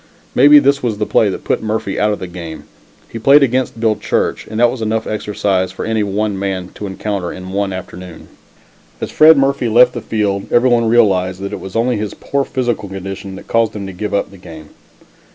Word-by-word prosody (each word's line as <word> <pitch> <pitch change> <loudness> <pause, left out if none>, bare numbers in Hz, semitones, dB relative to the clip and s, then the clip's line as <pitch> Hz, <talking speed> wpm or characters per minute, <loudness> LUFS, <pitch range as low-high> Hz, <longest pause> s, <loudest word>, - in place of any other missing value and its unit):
Maybe 145 +3 +7
this 140 0 +3
was 115 -4 -2
the 105 - -1
play 105 - +2
that 95 - -5
put - - -1
Murphy 110 -2 -2
out 105 0 +2
of 105 - -2
the - - -6
game. 85 -3 -8 0.4
He 115 - -7
played 140 +5 +6
against 130 -2 -1
Bill 110 -1 +2
Church, 105 - -2
and 110 +1 -5
that 120 0 +4
was 130 - -6
enough 110 0 -1
exercise 100 -3 -1
for - - -6
any 110 -1 0
one 100 0 -1
man 95 -2 -3
to 105 - -7
encounter 95 -2 -4
in 95 0 -8
one 100 0 -1
afternoon. 90 -2 -9 0.7
As - - -5
Fred 155 0 +7
Murphy 135 -3 +1
left 125 +2 +5
the - - -5
field 100 -3 -2
everyone 120 -1 +3
realized 95 -6 +2
that 100 - -5
it - - -4
was 95 - -9
only 120 +1 +1
his 105 -1 -4
poor 140 0 -2
physical 120 -7 -2
condition 95 0 -7
that 95 - -11
caused 115 -2 +1
him 100 -2 -5
to 95 - -7
give 105 +4 -4
up 100 - -1
the 100 - -13
game. 80 -3 -12
105 Hz, 215 wpm, -16 LUFS, 95-120 Hz, 0.7 s, Maybe